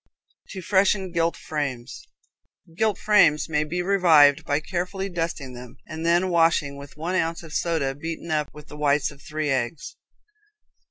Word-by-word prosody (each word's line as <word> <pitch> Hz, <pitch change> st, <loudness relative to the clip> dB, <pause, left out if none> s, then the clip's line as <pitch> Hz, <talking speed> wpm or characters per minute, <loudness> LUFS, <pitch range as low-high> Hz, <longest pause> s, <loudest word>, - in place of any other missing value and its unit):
To 190 Hz, -2 st, -7 dB
Freshen 190 Hz, 0 st, +2 dB
Gilt 170 Hz, 0 st, 0 dB
Frames. 140 Hz, -6 st, -5 dB, 0.7 s
Gilt 215 Hz, +1 st, +1 dB
frames 210 Hz, -8 st, +4 dB
may 150 Hz, -2 st, 0 dB
be 175 Hz, +4 st, -3 dB
revived 165 Hz, -7 st, +5 dB
by 145 Hz, +1 st, +1 dB
carefully 185 Hz, +4 st, -4 dB
dusting 165 Hz, -7 st, -4 dB
them, 125 Hz, -1 st, -11 dB
and 160 Hz, +1 st, -6 dB
then 175 Hz, +2 st, +2 dB
washing 165 Hz, -4 st, +2 dB
with 140 Hz, +1 st, -12 dB
one 165 Hz, +4 st, -3 dB
ounce 165 Hz, -2 st, -1 dB
of 160 Hz, -2 st, -11 dB
soda 160 Hz, -6 st, 0 dB
beaten 160 Hz, +3 st, -6 dB
up 150 Hz, -2 st, -1 dB
with 150 Hz, -1 st, -13 dB
the 150 Hz, -, -11 dB
whites 145 Hz, 0 st, +1 dB
of 140 Hz, -1 st, -16 dB
three 155 Hz, -1 st, -3 dB
eggs. 130 Hz, +4 st, -3 dB
160 Hz, 160 wpm, -24 LUFS, 145-175 Hz, 0.7 s, revived